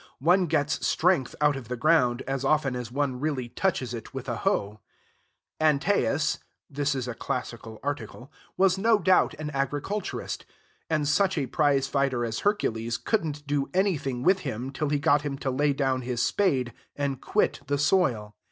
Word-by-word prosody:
One 180 +5 +3
gets 150 -1 0
strength 165 -7 +2
out 150 -1 +4
of 135 -4 -7
the 125 +1 -4
ground 125 -3 +3
as 135 0 -3
often 140 -2 +2
as 120 -2 -5
one 135 -1 -1
really 135 -4 -2
touches 130 -7 -1
it 120 +3 -8
with 135 0 -5
a 120 -3 -2
hoe. 105 0 -1 0.8
Antaeus 155 0 +2 0.3
(this 145 0 -1
is 130 -2 -3
a 125 - -3
classical 110 -1 -5
article) 145 -1 -5 0.3
was 190 0 +3
no 225 +2 +4
doubt 185 -2 +3
an 150 0 -5
agriculturist; 145 +9 -3 0.5
and 155 -2 +1
such 190 +5 +2
a 140 - +1
prize 140 0 +2
fighter 135 -3 0
as 115 0 -3
Hercules 115 - 0
could 220 - 0
n't 150 -1 -6
do 145 -1 -1
anything 145 -10 0
with 190 +4 +4
him 130 -5 -4
till 150 +1 -2
he 145 - +2
got 145 +1 +3
him 145 -2 -4
to 135 -1 -2
lay 145 +3 +2
down 135 -2 0
his 125 -1 -3
spade, 135 -12 +1 0.2
and 140 -2 -2
quit 210 - +1
the 145 0 +1
soil. 135 - +1
140 Hz, 175 wpm, -27 LUFS, 125-155 Hz, 0.8 s, out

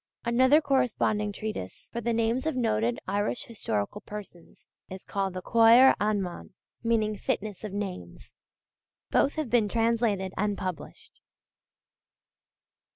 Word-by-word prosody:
Another 260 +6 +4
corresponding 245 -7 +1
treatise 200 - -6
for 235 - -3
the 235 +1 -1
names 230 +5 0
of 315 - -1
noted 120 - 0
Irish 205 +4 -1
historical 205 - -3
persons 200 -5 -11 0.2
is 190 0 -8
called 195 -2 -3
the 185 - -5
Cóir 230 +3 +7
Anmann, 200 -4 -2 0.3
meaning 220 -2 +1
'fitness 205 0 -3
of 210 - -5
names.' 195 -2 -6 0.8
Both 280 - +2
have 310 -6 -3
been 225 -4 +3
translated 225 -4 0
and 205 -1 -1
published. 185 -4 -7
215 Hz, 120 wpm, -27 LUFS, 195-235 Hz, 0.8 s, Cóir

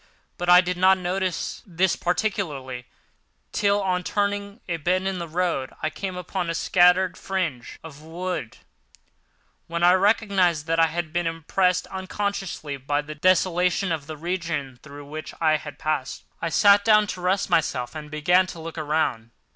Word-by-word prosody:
But 175 0 -2
I 180 0 +9
did 180 0 -3
not 190 +1 +5
notice 185 0 -2
this 185 -3 +1
particularly 150 - -2 0.6
till, 205 -1 +1
on 180 -1 0
turning 200 +4 -2
a 170 -2 -1
bend 185 +4 0
in 190 -1 -2
the 170 - -4
road, 165 -5 -1
I 155 - 0
came 185 +3 -5
upon 180 -1 -3
a 165 - -1
scattered 180 +1 +3
fringe 170 -11 -3
of 150 -2 -11
wood; 165 -6 -5 1.1
then 170 +1 -2
I 175 +1 +7
recognised 190 -5 +2
that 165 0 0
I 165 - +6
had 165 0 -4
been 175 -1 0
impressed 180 +3 0
unconsciously 190 -5 -4
by 145 +2 -1
the 155 +1 -7
desolation 180 +2 +2
of 155 -3 -3
the 155 -1 -7
region 165 -6 -3
through 145 -1 -11
which 155 +2 -8
I 155 -2 +3
had 150 -1 -9
passed. 150 -4 -3 0.2
I 165 - -1
sat 200 +4 +5
down 215 0 +5
to 185 -2 -6
rest 185 +2 0
myself, 125 -5 0
and 155 -1 -8
began 175 +5 +3
to 170 - -8
look 165 0 -7
around. 150 -7 -1
175 Hz, 165 wpm, -24 LUFS, 155-185 Hz, 1.1 s, I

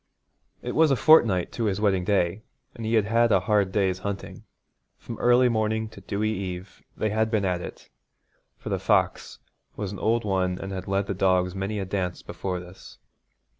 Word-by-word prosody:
It - - -4
was 160 0 +4
a 135 - +3
fortnight 110 - +4
to 115 - -2
his 100 -2 0
wedding 100 -3 +2
day, 95 0 0 0.3
and 115 -2 -6
he 115 - +1
had 110 -2 +3
had 115 +2 +2
a 95 -3 +4
hard 100 0 +1
day's 95 -2 0
hunting. 100 0 -6 0.5
From 115 - -9
early 125 +1 +5
morning 110 -1 0
to - - -13
dewy 110 +1 -2
eve 95 -1 -6 0.2
they 110 - -1
had 110 +1 +1
been 110 -3 0
at 90 -2 -1
it, - - -9 0.7
for - - -8
the - - -1
fox - - 0 0.4
was 105 -2 -4
an 100 - -7
old 115 0 +1
one 95 -2 0
and 95 +1 -6
had 95 -1 -5
led 100 0 0
the 100 - -3
dogs 90 -1 +1
many 95 +2 -3
a 100 - -2
dance 95 -2 -3
before 90 -2 -4
this. 90 +2 -13
100 Hz, 195 wpm, -25 LUFS, 95-110 Hz, 0.7 s, early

